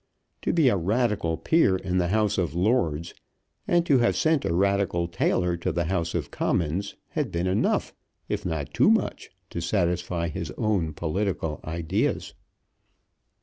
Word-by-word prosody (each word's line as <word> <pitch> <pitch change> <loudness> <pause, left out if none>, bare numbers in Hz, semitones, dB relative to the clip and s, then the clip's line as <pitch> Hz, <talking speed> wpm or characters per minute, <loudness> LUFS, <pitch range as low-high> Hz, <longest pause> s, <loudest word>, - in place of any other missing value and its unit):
To - - 0
be 160 -5 +3
a 120 - +4
Radical 100 -3 0
peer 160 - +3
in 95 0 -1
the 90 - +1
House 105 +1 +1
of 85 -4 -1
Lords, 85 -5 +1 0.5
and 175 -1 +3
to 140 -6 +4
have 120 - +2
sent 160 -3 +2
a - - 0
Radical 95 -1 +1
tailor 85 +1 +1
to 85 - -2
the 85 - 0
House 85 -1 -1
of - - -3
Commons, 85 +5 -1
had - - -2
been 85 +1 -1
enough, 95 +2 +1 0.3
if - - -2
not 80 -5 -3
too - - +4
much, - - 0 0.2
to 85 - -4
satisfy 85 -1 0
his 85 -1 -5
own 95 -8 0
political 85 -1 -2
ideas. 80 0 -1
90 Hz, 155 wpm, -26 LUFS, 85-105 Hz, 0.5 s, a